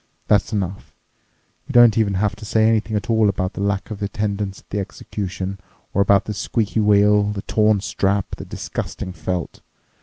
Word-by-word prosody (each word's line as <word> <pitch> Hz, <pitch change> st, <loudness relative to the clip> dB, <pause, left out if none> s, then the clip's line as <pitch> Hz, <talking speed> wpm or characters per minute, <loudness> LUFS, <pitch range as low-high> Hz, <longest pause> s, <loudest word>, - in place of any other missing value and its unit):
That's 105 Hz, +1 st, +2 dB
enough. 95 Hz, -3 st, -4 dB, 0.7 s
You -, -, -6 dB
don't 120 Hz, -3 st, +7 dB
even 105 Hz, -3 st, +1 dB
have 100 Hz, +1 st, 0 dB
to 110 Hz, -, -11 dB
say 110 Hz, +1 st, +2 dB
anything 110 Hz, -1 st, +1 dB
at 105 Hz, -, -4 dB
all 110 Hz, -3 st, +3 dB
about 95 Hz, -1 st, -2 dB
the -, -, -5 dB
lack 100 Hz, +1 st, -1 dB
of 105 Hz, -1 st, -6 dB
attendance 100 Hz, -1 st, -3 dB
at -, -, -39 dB
the 100 Hz, -, -1 dB
execution 95 Hz, -1 st, -5 dB, 0.3 s
or 100 Hz, -, +2 dB
about 100 Hz, 0 st, +4 dB
the 105 Hz, -, -3 dB
squeaky 110 Hz, +1 st, -1 dB
wheel, 105 Hz, 0 st, +4 dB
the 100 Hz, -1 st, -5 dB
torn 105 Hz, -2 st, +2 dB
strap, 100 Hz, -1 st, -1 dB
the -, -, -8 dB
disgusting 90 Hz, -, -5 dB
felt. 85 Hz, 0 st, -4 dB
100 Hz, 180 wpm, -21 LUFS, 95-105 Hz, 0.7 s, don't